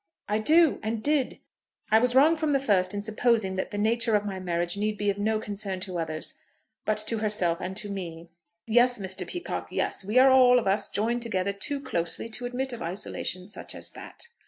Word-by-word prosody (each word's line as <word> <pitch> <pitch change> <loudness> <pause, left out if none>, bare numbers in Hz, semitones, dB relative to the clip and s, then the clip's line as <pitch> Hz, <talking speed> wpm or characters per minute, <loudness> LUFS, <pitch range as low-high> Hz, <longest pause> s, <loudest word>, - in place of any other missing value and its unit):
"I 210 +1 0
do, 320 +7 +4
and 220 0 -3
did. 290 -3 0 0.5
I 220 - +7
was 250 +1 +1
wrong 300 +5 +6
from 310 -2 0
the 275 - +3
first 190 -8 +2
in 205 0 -4
supposing 220 -2 +1
that 190 - -2
the 205 - -5
nature 225 +1 +2
of 205 0 +1
my 195 -2 -4
marriage 175 -1 -2
need 210 +1 -1
be 205 -1 +1
of 200 - -7
no 215 +1 +1
concern 200 -3 -4
to 185 -2 -3
others, 160 -1 -4 0.5
but 215 - +1
to 225 0 -1
herself 190 -5 +1
and 190 +1 -5
to 210 - -2
me." 170 -4 -7 0.3
"Yes, 245 +2 +4
Mr. 190 -2 -3
Peacocke; 355 -1 -5
yes. - - -1
We 210 +5 -1
are, 265 +1 +7
all 250 -1 +7
of 245 - 0
us, 200 +1 +1
joined 235 +3 -1
together 200 -4 -1
too 280 +8 -2
closely 175 -5 -3
to 245 +2 -1
admit 255 +1 -3
of 235 - -7
isolation 180 +1 -3
such 210 - -9
as - - -8
that." - - -12
215 Hz, 210 wpm, -27 LUFS, 190-245 Hz, 0.5 s, I